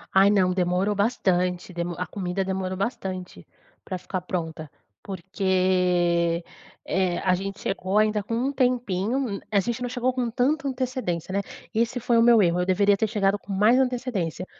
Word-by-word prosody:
Ai, 195 Hz, +1 st, +7 dB
não, 190 Hz, -3 st, +3 dB
demorou 180 Hz, +2 st, +1 dB
bastante, 185 Hz, -4 st, 0 dB
demo 170 Hz, 0 st, -3 dB
a 180 Hz, -, -2 dB
comida 190 Hz, 0 st, -3 dB
demorou 190 Hz, -1 st, -2 dB
bastante 185 Hz, -, -4 dB, 0.4 s
pra 185 Hz, -, -4 dB
ficar 185 Hz, +1 st, -4 dB
pronta. 160 Hz, -4 st, -4 dB, 0.3 s
Porque, 180 Hz, -2 st, +1 dB, 0.4 s
eh, 185 Hz, -2 st, 0 dB
a 185 Hz, -1 st, +3 dB
gente 195 Hz, +1 st, -3 dB
chegou 195 Hz, +1 st, -1 dB
ainda 215 Hz, -1 st, +3 dB
com 230 Hz, +3 st, -4 dB
um 260 Hz, +4 st, 0 dB
tempinho, 245 Hz, -4 st, 0 dB
um 240 Hz, -8 st, -2 dB
a 200 Hz, -, +4 dB
gente 235 Hz, +4 st, -2 dB
não 245 Hz, -, -2 dB
chegou 250 Hz, +1 st, 0 dB
com 245 Hz, -2 st, -1 dB
tanta 275 Hz, +5 st, 0 dB
antecedência, 250 Hz, -, -3 dB
né? 200 Hz, -, +1 dB, 0.3 s
E 220 Hz, -, 0 dB
esse 245 Hz, +2 st, -1 dB
foi 235 Hz, 0 st, +2 dB
o 230 Hz, -, +5 dB
meu 235 Hz, -2 st, +6 dB
erro, 175 Hz, 0 st, +2 dB
eu -, -, 0 dB
deveria 200 Hz, +2 st, +3 dB
ter 220 Hz, +2 st, 0 dB
chegado 205 Hz, -2 st, +1 dB
com 200 Hz, -, -10 dB
mais 210 Hz, +5 st, +4 dB
antecedência. 240 Hz, -10 st, -1 dB
195 Hz, 175 wpm, -25 LUFS, 180-230 Hz, 0.4 s, Ai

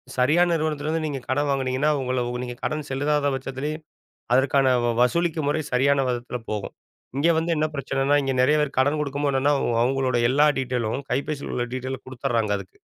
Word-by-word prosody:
சரியான 155 Hz, +8 st, +3 dB
நிறுவனத்திலிருந்து 155 Hz, 0 st, -1 dB
நீங்க 145 Hz, -3 st, -3 dB
கடன் 145 Hz, +3 st, 0 dB
வாங்குனீங்கன்னா, 135 Hz, +2 st, +1 dB
உங்கள 125 Hz, -1 st, -1 dB
ஒ -, -, -3 dB
நீங்க 125 Hz, -1 st, -6 dB
கடன் 155 Hz, -1 st, -2 dB
செலுதாத 145 Hz, +2 st, +1 dB
பட்சத்திலயும் 135 Hz, +4 st, -5 dB, 0.5 s
அதற்கான 135 Hz, 0 st, +4 dB, 0.3 s
வசூலிக்கும் 160 Hz, +4 st, +1 dB
முறை 155 Hz, +2 st, +1 dB
சரியான 135 Hz, +2 st, +3 dB
விதத்துல 120 Hz, 0 st, -3 dB
போகும். 105 Hz, -2 st, -4 dB, 0.4 s
இங்க 155 Hz, +4 st, +3 dB
வந்து 165 Hz, +1 st, 0 dB
என்ன 155 Hz, 0 st, +2 dB
பிரச்சனனா 135 Hz, +1 st, +1 dB
இங்க 135 Hz, -1 st, -1 dB
நெறைய 145 Hz, +4 st, +4 dB
பேர் 145 Hz, -, -4 dB
கடன் 145 Hz, +3 st, +2 dB
குடுக்கும்போ 145 Hz, 0 st, -1 dB
என்னன்னா 135 Hz, +2 st, +2 dB, 0.3 s
அவங்களோட 130 Hz, 0 st, +1 dB
எல்லா 145 Hz, +3 st, +4 dB
டீட்டெய்லும் 125 Hz, 0 st, -2 dB
கைபேசில 140 Hz, +2 st, -2 dB
உள்ள 120 Hz, -1 st, -1 dB
டீட்டெய்லும் 130 Hz, 0 st, -5 dB
குடுத்தர்றாங்க, 120 Hz, -4 st, -1 dB
அதுக்கு. 95 Hz, -1 st, -12 dB
135 Hz, 165 wpm, -24 LUFS, 130-150 Hz, 0.5 s, அதற்கான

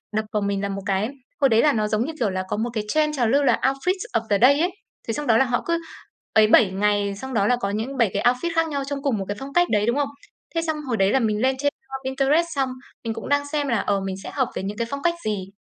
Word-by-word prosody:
đập 215 Hz, 0 st, 0 dB
vào 210 Hz, -, +1 dB
mình 200 Hz, -1 st, -1 dB
là 200 Hz, -, -2 dB
một 195 Hz, 0 st, -4 dB
cái 200 Hz, +2 st, 0 dB, 0.3 s
hồi 275 Hz, -, +5 dB
đấy 225 Hz, -1 st, +4 dB
là 295 Hz, -, +4 dB
nó 215 Hz, -1 st, 0 dB
giống 215 Hz, +3 st, 0 dB
như 320 Hz, -, -4 dB
kiểu 225 Hz, -, +1 dB
là 185 Hz, 0 st, -2 dB
có -, -, -1 dB
một 235 Hz, +2 st, -1 dB
cái 215 Hz, -, -1 dB
trend 300 Hz, +3 st, +1 dB
trào 240 Hz, -, +2 dB
lưu 280 Hz, +5 st, +3 dB
là 250 Hz, -4 st, +3 dB
oufit 275 Hz, +7 st, +1 dB, 0.2 s
of 230 Hz, -, +2 dB
the 205 Hz, -, +4 dB
day 280 Hz, +4 st, +6 dB
ấy. 355 Hz, +3 st, +1 dB, 0.4 s
Thế 225 Hz, -, -1 dB
xong 295 Hz, +5 st, -4 dB
đó 225 Hz, -1 st, +5 dB
là 265 Hz, -, +4 dB
họ 245 Hz, -1 st, -1 dB
cứ 335 Hz, 0 st, +1 dB, 0.5 s
ấy 215 Hz, -1 st, +6 dB
7 215 Hz, -3 st, +5 dB
ngày 205 Hz, 0 st, +1 dB
xong 265 Hz, +6 st, -7 dB
đó 205 Hz, -3 st, +2 dB
là 250 Hz, -, +4 dB
có 200 Hz, -5 st, -3 dB
những 225 Hz, +7 st, -3 dB
7 230 Hz, -5 st, +3 dB
cái 200 Hz, -, -1 dB
outfit 250 Hz, +8 st, +2 dB
khác 330 Hz, 0 st, +2 dB
nhau 280 Hz, -2 st, -2 dB
trong 280 Hz, -1 st, -3 dB
cùng 265 Hz, -7 st, +1 dB
một 195 Hz, -, -3 dB
cái 205 Hz, -, -4 dB
phong 275 Hz, +1 st, -8 dB
cách 350 Hz, 0 st, +3 dB
đấy, 210 Hz, 0 st, +2 dB
đúng 235 Hz, -, +1 dB
không? 285 Hz, -1 st, 0 dB, 0.5 s
Thế 330 Hz, -, +2 dB
xong 320 Hz, -2 st, -2 dB
hồi 235 Hz, -3 st, 0 dB
đấy 195 Hz, 0 st, +3 dB
là 265 Hz, -, +3 dB
mình 215 Hz, -2 st, 0 dB
lên 260 Hz, +1 st, +2 dB
trên, 285 Hz, +1 st, +1 dB, 0.2 s
ơ, 270 Hz, 0 st, -5 dB
Pinterest 275 Hz, +5 st, +2 dB
xong 270 Hz, -2 st, +1 dB, 0.3 s
mình 225 Hz, -1 st, -2 dB
cũng 225 Hz, -, -7 dB
đang 285 Hz, 0 st, +3 dB
xem 295 Hz, -2 st, 0 dB
là, 235 Hz, -, +1 dB
ờ, 200 Hz, -1 st, 0 dB
mình 190 Hz, -1 st, -3 dB
sẽ -, -, -7 dB
hợp 260 Hz, -3 st, +1 dB
với -, -, -3 dB
những 205 Hz, +2 st, -4 dB
cái 235 Hz, -, -2 dB
phong 280 Hz, +2 st, -4 dB
cách 340 Hz, 0 st, +3 dB
gì. 195 Hz, -3 st, -2 dB
240 Hz, 305 wpm, -23 LUFS, 210-280 Hz, 0.5 s, day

